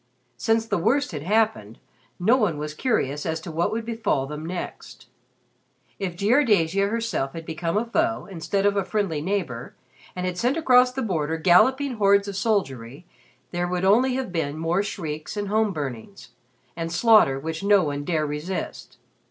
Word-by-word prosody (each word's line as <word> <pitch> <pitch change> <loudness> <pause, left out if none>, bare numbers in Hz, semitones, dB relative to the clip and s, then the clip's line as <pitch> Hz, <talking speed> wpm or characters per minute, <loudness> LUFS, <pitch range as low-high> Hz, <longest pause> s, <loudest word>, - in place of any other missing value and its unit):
Since 225 - +1
the 225 - -1
worst 270 +10 +1
had 150 -4 -5
happened, 205 - 0 0.4
no 215 +8 +4
one 210 - +1
was 150 0 -5
curious 150 - -1
as 160 0 -2
to 170 - -7
what 165 +2 0
would 225 0 -3
befall 225 -12 -1
them 150 +2 -7
next. 180 0 -7 0.9
If 185 -3 -3
Jiardasia 200 - +2
herself 225 -12 -2
had 165 -1 -7
become 165 +3 -2
a 225 - 0
foe, 115 - 0
instead 195 +1 -2
of 205 0 +3
a 200 - +1
friendly 185 -7 -1
neighbor, 160 -10 -3 0.4
and 180 0 -3
had 180 -1 -3
sent 250 +6 +1
across 250 -5 +5
the 265 +1 -3
border 160 -6 -1
galloping 250 - +3
hordes 200 -1 +4
of 200 - -5
soldiery, 145 - -2 0.5
there 175 0 -1
would 180 +1 -1
only 250 +6 +4
have 260 -7 -3
been 155 -4 -2
more 165 +4 0
shrieks, 155 -2 -5
and 205 -1 -3
home 215 0 +2
burnings, 145 - -6 0.5
and 165 0 -4
slaughter 175 - +4
which 160 +2 -5
no 200 -2 +5
one 145 -1 -3
dare 155 -1 0
resist. 150 +6 -5
185 Hz, 170 wpm, -24 LUFS, 155-220 Hz, 0.9 s, across